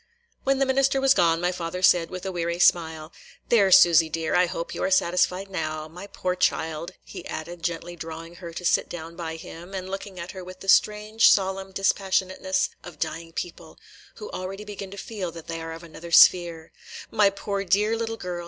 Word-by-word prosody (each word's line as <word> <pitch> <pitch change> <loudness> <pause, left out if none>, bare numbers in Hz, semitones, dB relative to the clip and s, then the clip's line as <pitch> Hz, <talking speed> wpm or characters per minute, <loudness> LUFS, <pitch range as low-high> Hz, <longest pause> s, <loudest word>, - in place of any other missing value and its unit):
When 270 0 +3
the 275 - +2
minister 270 +1 +2
was 270 0 +5
gone, 165 -1 +3
my 175 +1 0
father 180 0 -5
said, 175 -2 +5
with 185 0 -7
a 190 - -2
weary 170 -1 -2
smile: 160 -3 +2 0.4
"There, 200 -5 +4
Susy 170 -2 +7
dear, 160 0 -2
I 180 0 +4
hope 170 0 -5
you - - -5
are - - +1
satisfied 185 +1 +2
now. 155 -4 -4
My 180 +5 -10
poor 185 -2 -2
child," 160 -2 -1
he - - -9
added, 170 +2 -7
gently 175 +1 -4
drawing 165 +1 -8
her 170 -2 -8
to 180 +2 -7
sit - - +2
down 165 -1 -8
by 165 -1 -5
him, 170 +3 -10
and 185 -1 -5
looking 195 -1 -6
at 170 +1 -6
her 190 -1 -8
with 185 +1 -11
the 195 - -10
strange, 215 +3 +4
solemn 190 -1 +1
dispassionateness 190 -1 0
of 175 -3 -11
dying 165 +2 -4
people, 170 -1 -7 0.4
who 430 - -9
already 195 +2 -6
begin 200 -2 -7
to 200 - -10
feel 195 -4 -5
that 165 -1 -10
they 165 0 -5
are 165 0 -6
of 165 +1 -9
another 170 +1 -10
sphere, 170 -2 +5 0.2
– - - -11
"my 210 -2 +4
poor 200 0 -3
dear 210 +4 +2
little 225 0 -3
girl! 180 -3 -5
180 Hz, 205 wpm, -25 LUFS, 165-195 Hz, 0.4 s, Susy